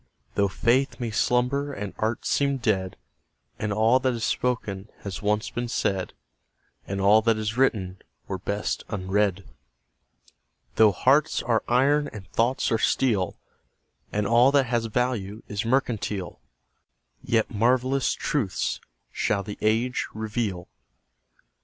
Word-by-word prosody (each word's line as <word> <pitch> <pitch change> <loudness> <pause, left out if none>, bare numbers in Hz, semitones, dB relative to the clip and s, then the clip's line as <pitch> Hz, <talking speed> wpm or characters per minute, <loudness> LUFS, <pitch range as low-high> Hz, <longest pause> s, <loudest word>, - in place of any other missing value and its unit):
Though 100 -1 +2
faith 120 +8 +1
may 120 -2 -3
slumber 125 +6 +1
and 105 -6 -5
art 110 +2 -1
seem 140 -1 +1
dead, 95 -6 -1 0.6
And 105 - -2
all 110 +5 +4
that 130 -1 0
is 115 - -4
spoken 110 -6 -2
has 100 -3 -6
once 105 +1 0
been 120 0 -3
said, 95 -5 -1 0.7
And 100 0 -3
all 100 +3 +5
that 115 0 +2
is 110 +1 -2
written 95 -8 0 0.3
were 95 -1 -4
best 100 +3 -2
unread; 100 -1 0 1.3
Though 110 -1 +7
hearts 135 +10 +2
are 115 -2 +1
iron 140 +4 +3
and 95 -3 -10
thoughts 120 +3 +1
are 115 - +2
steel, 110 -7 +1 0.7
And 105 0 -1
all 120 +5 +5
that 140 -2 +4
has 115 -1 0
value 115 -3 -2
is 105 +1 -3
mercantile, 110 -7 -1 0.8
Yet 115 -2 +1
marvellous 130 +4 +2
truths 125 -11 -1 0.3
shall 100 -1 0
the 105 0 -8
age 115 +4 +1
reveal. 105 -4 -3
110 Hz, 130 wpm, -25 LUFS, 100-125 Hz, 1.3 s, Though